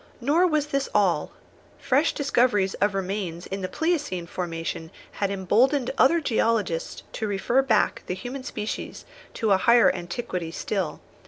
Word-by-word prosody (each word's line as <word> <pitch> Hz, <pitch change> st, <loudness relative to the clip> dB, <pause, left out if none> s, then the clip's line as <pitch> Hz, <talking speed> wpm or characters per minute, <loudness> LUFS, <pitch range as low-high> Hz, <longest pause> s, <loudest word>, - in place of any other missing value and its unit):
Nor 305 Hz, +9 st, +3 dB
was 305 Hz, -3 st, +1 dB
this 275 Hz, -2 st, -2 dB
all. 180 Hz, -7 st, +2 dB, 0.5 s
Fresh 280 Hz, +4 st, +2 dB
discoveries 240 Hz, -8 st, +2 dB
of 205 Hz, -1 st, +2 dB
remains 185 Hz, -3 st, -3 dB
in 195 Hz, 0 st, -5 dB
the 185 Hz, -, -2 dB
pleiocene 295 Hz, -, -1 dB
formation 165 Hz, -2 st, -4 dB, 0.2 s
had 200 Hz, -, -2 dB
emboldened 235 Hz, +8 st, +2 dB
other 335 Hz, +6 st, +4 dB
geologists 225 Hz, -, 0 dB
to 220 Hz, -, -3 dB
refer 205 Hz, +6 st, +2 dB
back 230 Hz, -6 st, +1 dB
the 180 Hz, -, -2 dB
human 250 Hz, +7 st, -6 dB
species 215 Hz, -4 st, -5 dB, 0.3 s
to 220 Hz, -3 st, 0 dB
a 195 Hz, -, +6 dB
higher 235 Hz, +4 st, +5 dB
antiquity 175 Hz, -1 st, -4 dB
still. 185 Hz, 0 st, -3 dB
210 Hz, 145 wpm, -25 LUFS, 185-265 Hz, 0.5 s, a